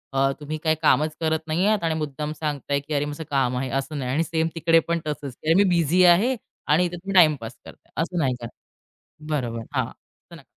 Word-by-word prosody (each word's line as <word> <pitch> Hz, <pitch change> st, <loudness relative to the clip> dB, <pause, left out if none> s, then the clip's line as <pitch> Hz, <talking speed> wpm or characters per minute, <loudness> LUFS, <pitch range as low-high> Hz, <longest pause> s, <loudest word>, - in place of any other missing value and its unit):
अ, 135 Hz, 0 st, +3 dB
तुम्ही 150 Hz, +1 st, -5 dB
काही 160 Hz, -1 st, +3 dB
कामच 155 Hz, 0 st, +3 dB
करत 160 Hz, -1 st, +1 dB
नाही 165 Hz, +4 st, +1 dB
आहात 215 Hz, -3 st, +2 dB
आणि 165 Hz, -1 st, +1 dB
मुद्दाम 150 Hz, 0 st, -4 dB
सांगताय, 145 Hz, -2 st, -1 dB
की 145 Hz, +2 st, -7 dB
अरे 145 Hz, 0 st, +1 dB
माझं 150 Hz, +2 st, -5 dB
काम 130 Hz, -3 st, +1 dB
आहे 130 Hz, +1 st, -2 dB
असं 150 Hz, +2 st, -5 dB
नाही 130 Hz, -2 st, -3 dB
आणि 155 Hz, +5 st, +1 dB
सेम 160 Hz, -1 st, 0 dB
तिकडे 165 Hz, 0 st, +4 dB
पण 170 Hz, 0 st, 0 dB
तसंच, 145 Hz, -3 st, -4 dB
अ, 165 Hz, -, +5 dB
मी 200 Hz, -, +6 dB
बिझी 175 Hz, +1 st, +3 dB
आहे 200 Hz, +10 st, +5 dB, 0.3 s
आणि 160 Hz, +5 st, +4 dB
इथे 175 Hz, -, -4 dB
तुम्ही 195 Hz, +3 st, -6 dB
टाईमपास 150 Hz, -9 st, +4 dB
करताय, -, -, -15 dB
असं 175 Hz, +2 st, -3 dB
नाही 130 Hz, -5 st, +1 dB
का 120 Hz, -, -5 dB, 0.8 s
बरोबर, 120 Hz, -6 st, -2 dB
हां. -, -, +1 dB
असं -, -, -18 dB
नका -, -, -14 dB
155 Hz, 215 wpm, -24 LUFS, 140-165 Hz, 0.8 s, मी